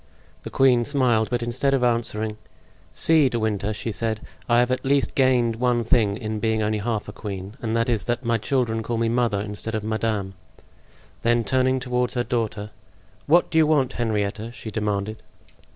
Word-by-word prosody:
The - - -7
queen 125 -3 +4
smiled, 120 -5 +1
but 120 -1 -1
instead 130 +4 +1
of 130 - 0
answering: 110 -3 -1 0.5
"See, 155 -4 +5
De 120 - -2
Winter," 105 -2 -1
she 110 +2 -4
said, 110 +2 -2 0.3
"I 120 - +4
have 120 +1 +3
at 130 - -1
least 140 0 +1
gained 125 -4 +2
one 120 -1 +1
thing 105 -3 +2
in 110 -1 -4
being 110 0 0
only 105 0 0
half 110 0 -2
a - - -6
queen; 100 0 -7
and 115 -1 -2
that 115 +2 +1
is 110 -7 0
that 120 +1 -2
my 115 0 +2
children 115 -1 0
call 115 +1 -3
me 115 0 +1
'mother' 115 -4 +1
instead 105 +2 -5
of 110 - -3
'madame.'" 110 -3 -2 0.9
Then 120 0 +2
turning 130 +1 +1
toward 125 -1 -1
her 120 - 0
daughter: 110 -4 -3 0.6
"What 170 +4 +4
do 160 - +3
you 155 - +5
want, 140 -4 +2
Henrietta?" 110 -1 -2
she 110 -2 -8
demanded. 105 0 -2
115 Hz, 185 wpm, -23 LUFS, 110-125 Hz, 0.9 s, See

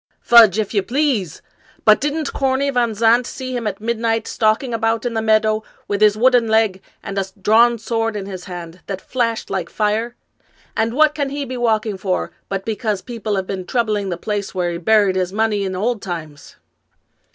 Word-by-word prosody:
" - - -47
Fudge, 225 -5 +8
if 215 -1 -2
you 200 - +2
please! 240 - -1 0.4
But 215 -1 +6
didn't 295 +1 -2
Corney 270 +1 0
Van 240 -4 0
Zandt 230 +3 +3
see 255 -1 -5
him 235 -3 -2
at 195 -2 -4
midnight, 225 0 -1
stalking 225 +2 0
about 225 +1 0
in 240 - -1
the 220 - -1
meadow 215 0 +2 0.3
with 205 0 -2
his 210 0 +5
wooden 245 0 +4
leg, 220 -4 +2 0.2
and 200 0 -3
a 195 - -1
drawn 230 +4 +4
sword 225 0 -2
in 200 -2 -4
his 185 -2 -7
hand, 175 -1 -8
that 195 -2 -4
flashed 230 0 -2
like 180 -3 -2
fire? 220 +3 -1 0.6
And 225 +2 0
what 305 +1 +4
can 285 -3 -2
he 285 0 -4
be 255 0 -6
walking 220 -4 0
for 185 -1 -2 0.2
but 195 -1 -3
because 215 -3 -2
people 225 -4 -3
have 190 -1 -1
been 190 -1 -4
troubling 215 -5 0
the 175 - -3
place 205 0 -4
where 175 -1 0
he 170 - -4
buried 205 +1 +3
his 185 -1 -1
money 210 -1 0
in 190 -1 -3
old 220 +3 -1
times 155 -5 -7
220 Hz, 195 wpm, -19 LUFS, 195-235 Hz, 0.6 s, Fudge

